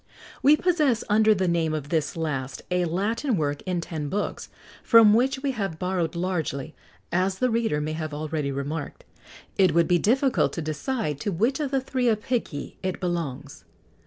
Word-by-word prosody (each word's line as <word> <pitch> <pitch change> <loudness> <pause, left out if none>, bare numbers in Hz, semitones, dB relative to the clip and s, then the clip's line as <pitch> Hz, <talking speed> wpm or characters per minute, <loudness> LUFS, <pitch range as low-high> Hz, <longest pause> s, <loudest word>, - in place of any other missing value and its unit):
We 295 +3 +6
possess, 305 -10 +2
under 215 +1 +5
the 190 -1 0
name 165 -2 +1
of 145 -2 -5
this 155 -1 -1
last, 140 -5 -3
a 180 0 +2
Latin 210 - 0
work 145 -2 -1
in 180 -2 -1
ten 155 -3 -5
books, 205 +5 -3 0.3
from 225 -2 +7
which 265 +4 +1
we 280 - +1
have 195 -9 -3
borrowed 180 -2 -1
largely, 160 -5 -2 0.4
as 185 +2 +1
the 255 +2 +1
reader 225 -10 +1
may 155 +1 -2
have 155 -1 -4
already 150 -1 -3
remarked. 140 +2 -5 0.6
It 185 -5 +4
would 170 -1 +4
be 175 -1 +3
difficult 260 - +2
to 165 - -3
decide 155 - -2
to 200 - -2
which 230 - +1
of 295 -3 -1
the 270 -1 0
three 255 -1 -1
Apicii 215 - -2
it 185 -1 -3
belongs. 150 -6 -4
180 Hz, 175 wpm, -25 LUFS, 155-230 Hz, 0.6 s, from